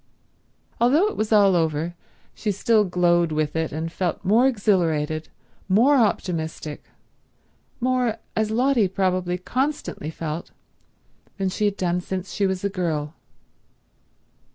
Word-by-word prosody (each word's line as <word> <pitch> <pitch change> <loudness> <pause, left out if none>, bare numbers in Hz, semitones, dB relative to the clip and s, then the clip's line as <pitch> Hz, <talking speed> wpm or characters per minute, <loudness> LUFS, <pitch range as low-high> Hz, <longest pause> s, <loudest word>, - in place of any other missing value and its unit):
Although 295 - +4
it - - -7
was 215 0 -2
all 200 -3 +5
over 160 0 0 0.4
she 210 - -2
still 215 +2 +3
glowed 175 -2 +2
with 155 0 -1
it 160 -1 -1
and 160 +2 -4
felt 180 +2 -3
more 225 +7 +5
exhilarated, 165 - 0 0.4
more 240 +10 +5
optimistic, 160 - -1 0.9
more 250 -2 +1 0.2
as 220 0 +1
Lotty 240 -1 +2
probably 185 -1 0
constantly 255 - -3
felt, 160 0 -5 0.9
than 195 -1 0
she 210 +3 -1
had 205 -1 0
done 180 -1 0
since 190 +1 -5
she 200 -2 +1
was 190 0 -3
a - - +2
girl. 160 -6 -2
185 Hz, 130 wpm, -23 LUFS, 165-220 Hz, 0.9 s, all